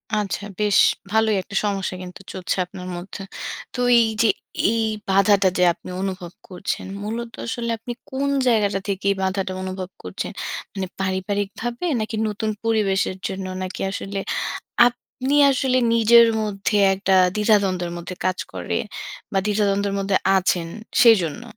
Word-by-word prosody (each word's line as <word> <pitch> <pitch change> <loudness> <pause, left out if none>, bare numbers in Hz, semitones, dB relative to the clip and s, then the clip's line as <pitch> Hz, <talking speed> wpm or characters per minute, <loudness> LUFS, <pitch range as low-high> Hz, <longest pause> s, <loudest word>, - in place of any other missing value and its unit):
আচ্ছা 205 -2 -2 0.2
বেশ 210 -1 +3 0.3
ভালোই 220 -1 +3
একটা 195 +2 -10
সমস্যা 195 -2 -1
কিন্তু 180 +1 -10
চলছে 185 -1 -2
আপনার 180 0 -9
মধ্যে। 190 +2 -8 0.5
তো 250 - -6 0.2
এই 225 - +4
যে 230 - +5 0.4
এই 230 0 +1 0.3
বাধাটা 195 0 +4
যে 180 - +3
আপনি 185 - -12
অনুভব 185 -3 -4 0.2
করছেন, 185 +1 -4 0.2
মূলত 230 +2 -4
আসলে 235 0 -3
আপনি 240 +2 -6 0.2
কোন 275 +1 -1 0.2
জায়গাটা 205 -4 +2
থেকে 195 -1 -2
এই - - 0
বাঁধাটা 190 0 -1
অনুভব 185 -1 -5
করছেন? 90 0 -5 0.4
মানে 190 -2 -3
পারিবারিকভাবে 200 - -2
নাকি 220 +1 -3
নতুন 215 +1 -2
পরিবেশের 195 -4 +1
জন্য, 190 0 -5 0.2
নাকি 185 - -5
আসলে 195 0 -4 0.7
আপনি 255 +3 -2 0.2
আসলে 260 -1 +1 0.2
নিজের 230 +1 +7 0.2
মধ্যে 205 0 -1 0.2
একটা 190 0 +1 0.2
দ্বিধাদ্বন্দ্বের 195 -5 +2
মধ্যে 175 +1 -6
কাজ 185 0 +1
করে 90 -1 -3 0.6
বা 195 - +2
দ্বিধাদ্বন্দ্বের 200 -1 +1
মধ্যে 195 -1 +1 0.2
আছেন, 180 -2 +1 0.3
সেইজন্য? 215 -5 +5
200 Hz, 140 wpm, -22 LUFS, 185-220 Hz, 0.7 s, নিজের